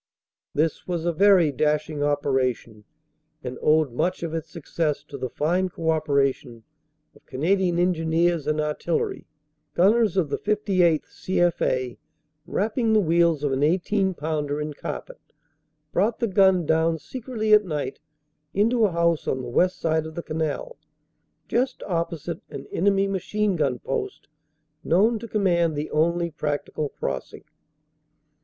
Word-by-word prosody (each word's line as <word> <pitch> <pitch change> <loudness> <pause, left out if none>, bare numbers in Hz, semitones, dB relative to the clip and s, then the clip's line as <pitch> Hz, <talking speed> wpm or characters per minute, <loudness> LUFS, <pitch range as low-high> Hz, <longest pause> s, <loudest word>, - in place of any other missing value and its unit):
This 155 +1 0
was 170 -2 -2
a 175 - +1
very 185 -3 +5
dashing 150 +2 0
operation, 130 -7 -1 0.6
and 125 0 -6
owed 155 -3 +3
much 170 +9 -1
of 165 -1 -3
its 165 -2 -4
success 160 -2 -2
to 145 - -11
the 130 -2 -4
fine 180 +8 0
co 165 -2 -1
operation 140 -6 0 0.5
of - - -21
Canadian 175 +5 +1
Engineers 170 -2 +1
and 155 0 0
Artillery. 150 +2 -2 0.5
Gunners 205 +1 +3
of 165 -6 +2
the - - -1
58th. 190 -6 +2
C.F.A., 150 -9 -1 0.5
wrapping 220 +2 0
the 215 - +5
wheels 170 -4 +2
of 145 - +1
an 135 +1 0
18 190 +4 +1
pounder 150 -2 -2
in 150 0 -4
carpet, - - -7 0.7
brought 220 +2 +1
the 235 - 0
gun 190 -3 +4
down 160 +1 +2
secretly 225 - -2
at 210 0 +7
night 150 -7 -4 0.6
into 225 +3 +3
a 200 - +1
house 170 -1 +1
on 130 -1 -1
the 120 - -6
west 180 +9 +1
side 160 -1 0
of 160 - -10
the 170 - -4
canal 160 - -3 0.7
just 255 +3 -1
opposite 170 -2 -3
an - - -8
enemy 195 +1 +2
machine 200 +1 -1
gun 140 -6 0
post, 405 - -4 0.6
known 215 +7 +3
to 230 - -8
command 175 -7 +1
the 150 +1 -4
only 170 +2 +1
practical 150 0 -3
crossing. 65 - -5
165 Hz, 140 wpm, -24 LUFS, 150-190 Hz, 0.7 s, at